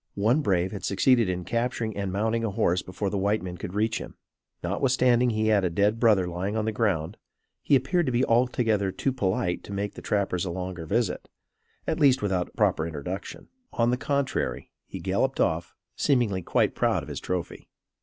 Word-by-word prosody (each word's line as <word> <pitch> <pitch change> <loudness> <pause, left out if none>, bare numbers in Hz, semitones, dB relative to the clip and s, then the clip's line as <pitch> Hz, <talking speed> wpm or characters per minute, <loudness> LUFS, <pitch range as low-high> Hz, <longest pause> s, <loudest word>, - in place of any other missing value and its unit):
One 115 +9 +3
brave 95 -7 +1
had 100 - -7
succeeded 115 +2 +3
in 90 0 -2
capturing 115 -2 -1
and 100 -2 -2
mounting 110 +4 0
a 115 - 0
horse 95 -2 +1
before 95 +2 -4
the 100 - -1
white 100 +2 +1
men 90 -1 -5
could 90 +2 -7
reach 110 +1 +1
him. - - -9 0.5
Notwithstanding 125 +5 +2
he 110 -1 +1
had 105 -3 +3
a 90 - +2
dead 105 +6 +1
brother 105 -6 +4
lying 95 +5 -3
on 110 - 0
the 110 - 0
ground, 100 -6 -1 0.4
he 145 - +3
appeared 155 +6 +1
to - - +1
be 125 +2 +2
altogether 115 -4 +2
too 135 +7 -1
polite 95 -6 -1
to - - -10
make 100 +1 -3
the - - -10
trappers 95 -4 0
a 90 - -3
longer 90 -1 -5
visit; - - -1 0.6
at - - -1
least, 135 -6 +4
without 95 -3 0
a - - -26
proper 80 - +2
introduction. 85 +5 -6 0.2
On 115 +1 +2
the - - +2
contrary, 140 +1 -2 0.2
he - - -7
galloped - - 0
off; 80 +1 0 0.2
seemingly, 120 -9 +1
quite - - +1
proud - - +1
of - - -10
his - - -4
trophy. 90 -2 -4
105 Hz, 195 wpm, -26 LUFS, 95-120 Hz, 0.6 s, brother